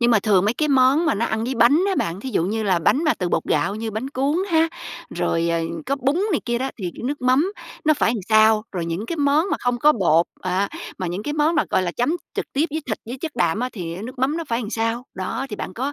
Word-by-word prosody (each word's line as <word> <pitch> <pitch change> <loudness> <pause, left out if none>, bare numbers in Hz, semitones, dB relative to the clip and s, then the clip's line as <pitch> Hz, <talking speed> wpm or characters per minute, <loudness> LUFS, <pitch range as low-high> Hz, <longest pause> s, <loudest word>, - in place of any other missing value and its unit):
Nhưng 240 0 +4
mà 225 - +5
thường 195 -2 +3
mấy 215 +4 +1
cái 300 +2 0
món 275 +4 +4
mà 315 - +2
nó 225 +3 0
ăn 220 +1 -1
với 255 +2 -2
bánh 250 +10 +4
á 390 - +1
bạn, 170 - -2
thí 265 - -5
dụ 165 - +1
như 220 +4 -1
là 190 -4 +2
bánh 270 - +2
mà 305 - +3
từ 180 - -2
bột - - 0
gạo 195 +4 0
như 220 +1 -4
bánh 220 +5 -4
cuốn 280 +3 0
ha, 325 0 +4 0.5
rồi, 170 0 0
ờ, 170 0 +1 0.3
có 275 - 0
bún 275 +1 +1 0.2
này 310 - +1
kia 240 -1 -1
đó 265 +2 -2
thì 180 -4 -3
nước 285 +3 -2
mắm 265 +10 +3 0.3
nó 310 0 +5
phải 250 - +2
làm 225 - -3
sao? 215 0 +5
Rồi 175 -3 -3
những 175 +7 -3
cái 335 - -3
món 290 +3 +3
mà - - +1
không 245 -1 0
có 300 +4 +5
bột, 170 - +3
à, 185 +2 0 0.3
mà 185 - -2
những 180 +4 -3
cái 295 - -3
món 310 +2 +2
mà, - - +3
gọi 190 - +2
là, 180 - -1
chấm 245 +4 0 0.2
trực - - -2
tiếp 285 +3 +2
với 315 +2 -2
thịt, 215 - -2
với 250 +3 -6
chất 315 0 -4
đạm 185 0 +1
á 250 - 0
thì 170 -5 -5
á 185 - -7
nước 250 +3 -8
mắm 275 +5 +1
nó 335 - -3
phải 230 +1 0
làm 215 -3 -5
sao? 230 +2 -1
Đó, 190 +8 -3
thì 210 - -4
bạn - - -5
có 270 +4 -2
235 Hz, 290 wpm, -22 LUFS, 200-280 Hz, 0.5 s, mà